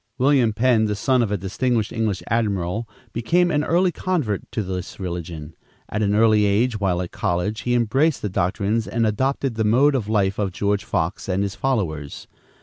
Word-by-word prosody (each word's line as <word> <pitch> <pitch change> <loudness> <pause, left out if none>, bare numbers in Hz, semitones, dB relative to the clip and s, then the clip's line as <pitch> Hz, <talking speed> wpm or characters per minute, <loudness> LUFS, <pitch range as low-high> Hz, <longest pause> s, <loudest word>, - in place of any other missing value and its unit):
William 130 -3 +3
Penn, 115 0 +2
the 105 -1 -1
son 130 +5 +2
of 110 -3 0
a 105 - +1
distinguished 110 +4 -1
English 110 -4 -1
admiral, 105 -1 -1 0.2
became 175 +10 +2
an 150 -1 +1
early 175 +3 +2
convert 155 - -2
to 110 - -2
this 90 0 -6
religion. 85 -4 -5 0.4
At 105 - -2
an 100 -1 +2
early 110 -1 +4
age, 110 +3 +1
while 90 -3 0
at 90 - -8
college, 95 +3 -1
he 120 0 0
embraced 130 +6 +1
the - - 0
doctrines 100 +4 -1
and 115 0 0
adopted 130 +4 0
the 110 0 -1
mode 130 +7 +4
of 115 -6 -2
life 100 -2 +1
of 100 -3 -1
George 100 +1 -1
Fox 85 0 -2
and 95 +2 +1
his 100 -1 -3
followers. 85 - -2
105 Hz, 185 wpm, -22 LUFS, 95-120 Hz, 0.4 s, early